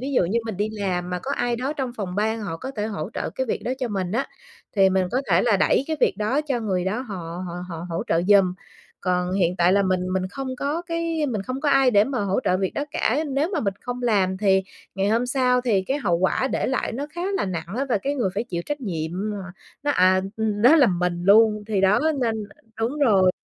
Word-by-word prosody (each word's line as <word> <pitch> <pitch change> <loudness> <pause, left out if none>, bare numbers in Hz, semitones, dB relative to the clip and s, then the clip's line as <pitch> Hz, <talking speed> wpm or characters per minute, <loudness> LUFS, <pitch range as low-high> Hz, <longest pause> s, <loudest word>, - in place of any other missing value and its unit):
ví 275 +2 -4
dụ 215 - +3
như 215 +7 0
mình 215 -5 -4
đi 210 +2 0
làm 185 -4 -2
mà 180 - -2
có 275 - -4
ai 240 -1 0
đó 260 +4 -2
trong 270 -4 -3
phòng 185 -4 -4
ban 220 +2 0
họ 195 -6 -4
có 265 +9 -6
thể 210 - -1
hỗ 200 -3 -4
trợ - - -3
cái 260 - -3
việc - - -1
đó 250 - -1
cho 250 -3 -2
mình 190 -3 -2
á, 245 +5 0 0.5
thì 195 -1 +5
mình 185 -1 +2
có 260 - 0
thể - - +4
là 225 -4 +3
đẩy 265 - +2
cái 315 -1 -2
việc - - +3
đó 215 +7 +1
cho 250 -4 -1
người 185 -4 -1
đó 210 +6 -1
họ 180 -7 -6
họ 170 - -6
họ 165 0 -6
hỗ 165 - -2
trợ 165 - +1
giùm. 195 -3 +5 0.5
Còn 180 -1 0
hiện 180 -2 +1
tại 175 +1 +4
là 200 +1 +4
mình 185 -1 +1
mình 185 0 -1
không 270 +6 -5
có 295 +6 -2
cái 335 -2 -1
mình 215 -7 -2
không 255 +5 -4
có 300 - +1
ai 270 -2 +5
để 205 -2 +5
mà 255 -2 -2
hỗ 195 +4 0
trợ 185 -1 +2
việc 190 -1 -1
đó 285 - -1
cả. 295 +1 0
Nếu 285 +6 0
mà 320 - 0
mình 200 -3 -1
không 250 0 -5
làm 195 -5 +2
thì 190 -1 +3 0.3
ngày 195 +1 0
hôm 235 +3 +1
sau 250 -1 +2
thì 220 -6 +1
cái 270 +9 -2
hậu 175 -9 +1
quả 190 +8 +1
để - - 0
lại 265 - -1
nó 275 +5 -4
khá 345 +3 -5
là - - 0
nặng 175 -3 -4
á, 275 - 0
và 220 - +2
cái 280 +7 -2
người 235 -9 0
phải 220 - -1
chịu 175 -6 -4
trách 295 -1 -3
nhiệm 165 -8 -3 0.2
mà 210 - -4 0.5
nó 290 - +1
à 185 -6 +4 0.2
ừm, 215 -1 -1
nó 285 +7 +7
là 280 - +6
mình 175 -2 -1
luôn! 210 +1 +5
Thì 205 -3 0
đó 195 +2 +4 0.2
nên 230 -2 +1 0.5
đúng 250 +7 -1
rồi, 195 -9 +4
210 Hz, 260 wpm, -23 LUFS, 185-255 Hz, 0.5 s, nó